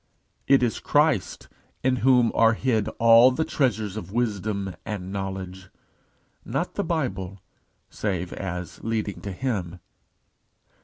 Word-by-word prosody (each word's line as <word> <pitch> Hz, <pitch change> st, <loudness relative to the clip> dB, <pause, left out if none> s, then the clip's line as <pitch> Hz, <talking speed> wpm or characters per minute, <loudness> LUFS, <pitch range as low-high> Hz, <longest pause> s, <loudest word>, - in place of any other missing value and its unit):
It 135 Hz, -2 st, +5 dB
is 115 Hz, -3 st, 0 dB
Christ -, -, +1 dB, 0.4 s
"in 130 Hz, 0 st, +2 dB
whom 125 Hz, -2 st, +4 dB
are 115 Hz, 0 st, +4 dB
hid 110 Hz, -3 st, 0 dB
all 115 Hz, +2 st, +7 dB
the 155 Hz, +5 st, -1 dB
treasures 110 Hz, -7 st, 0 dB
of 95 Hz, -4 st, -7 dB
wisdom 100 Hz, -4 st, -2 dB
and 100 Hz, -4 st, -5 dB
knowledge," 95 Hz, -1 st, -5 dB, 0.7 s
not -, -, -3 dB
the -, -, -1 dB
Bible, 95 Hz, 0 st, -3 dB, 0.5 s
save 90 Hz, -4 st, -3 dB
as 90 Hz, -2 st, -6 dB
leading 110 Hz, -3 st, -2 dB
to 100 Hz, -, -5 dB
him. 95 Hz, -5 st, -3 dB
105 Hz, 120 wpm, -25 LUFS, 95-115 Hz, 0.7 s, all